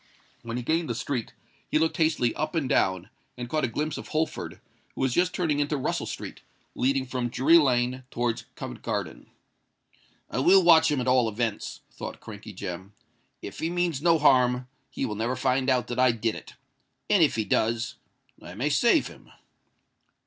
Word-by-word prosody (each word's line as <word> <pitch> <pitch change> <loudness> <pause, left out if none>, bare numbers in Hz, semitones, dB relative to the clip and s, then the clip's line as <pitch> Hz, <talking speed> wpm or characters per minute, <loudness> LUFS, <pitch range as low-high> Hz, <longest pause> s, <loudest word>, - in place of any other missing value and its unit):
When 115 +1 -5
he 125 - -4
gained 160 +3 0
the 120 - -1
street, 120 -1 -3 0.4
he - - +2
looked 160 +3 +1
hastily 155 -8 +2
up 155 +2 -3
and 155 -5 0
down, 95 -3 +1 0.3
and 120 0 -5
caught 155 +2 0
a - - -1
glimpse 150 +7 -3
of - - -9
Holford, 155 +1 -3 0.4
who - - -5
was 130 -2 +1
just 180 +3 +2
turning 160 -6 0
into 145 +1 0
Russell 130 - -2
Street, - - -7 0.3
leading 135 +1 +1
from 125 -1 -3
Drury 150 +8 +5
Lane 125 -2 +1
towards 120 -2 -2
Covent - - -7
Garden. - - -4 1.0
"I - - -3
will 185 +7 +6
watch 160 -2 +6
him 145 -3 0
at 125 - -3
all 125 -3 +4
events," 110 0 -3
thought - - -7
Crankey 110 0 -10
Jem. 95 +1 -7 0.5
"If - - -8
he 160 - -1
means 175 -5 -1
no 165 0 +4
harm, 125 -4 +3 0.2
he - - -3
will 105 - -3
never 115 +4 -1
find 130 +1 +1
out 125 -1 +2
that 120 +1 -4
I 130 -1 +5
did 115 -1 -1
it; - - -11 0.5
and 205 -4 +4
if 155 - +4
he 110 -1 -1
does, 115 +3 0 0.4
I 85 - -10
may 130 +8 -1
save 240 - +4
him." - - -12
130 Hz, 185 wpm, -26 LUFS, 120-155 Hz, 1.0 s, will